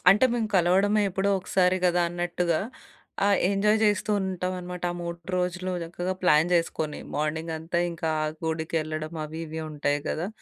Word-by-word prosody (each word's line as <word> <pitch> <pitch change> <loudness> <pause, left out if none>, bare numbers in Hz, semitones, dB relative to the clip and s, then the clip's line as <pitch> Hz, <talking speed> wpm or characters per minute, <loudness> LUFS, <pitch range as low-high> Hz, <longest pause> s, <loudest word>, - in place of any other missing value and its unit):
అంటే 210 +6 +5
మేము 225 -3 0
కలవడమే 195 +4 +4
ఎప్పుడో 195 +1 0
ఒకసారి 185 0 +2
గదా! 180 0 +3
అన్నట్టుగా 175 -1 0 0.6
ఆహ్, 200 -1 +4
ఎంజాయ్ 210 +2 +3
జేస్తూ 210 0 +2
ఉంటామనమాట. 180 -1 -3
ఆ - - -7
3 170 0 -4 0.2
రోజులు 180 +1 -1
చక్కగా 175 +2 -3
ప్లాన్ 160 -1 +4
జేసుకొని 160 -3 -1
మార్నింగంతా 160 +2 -2
ఇంకా 165 -1 -3
ఆ - - +1 0.2
గుడికెళ్ళడం 160 0 -2
అవి 160 +2 -6
ఇవి 160 +1 -5
ఉంటాయి 145 -1 0
గదా! 175 +5 -2
175 Hz, 145 wpm, -26 LUFS, 160-185 Hz, 0.6 s, అంటే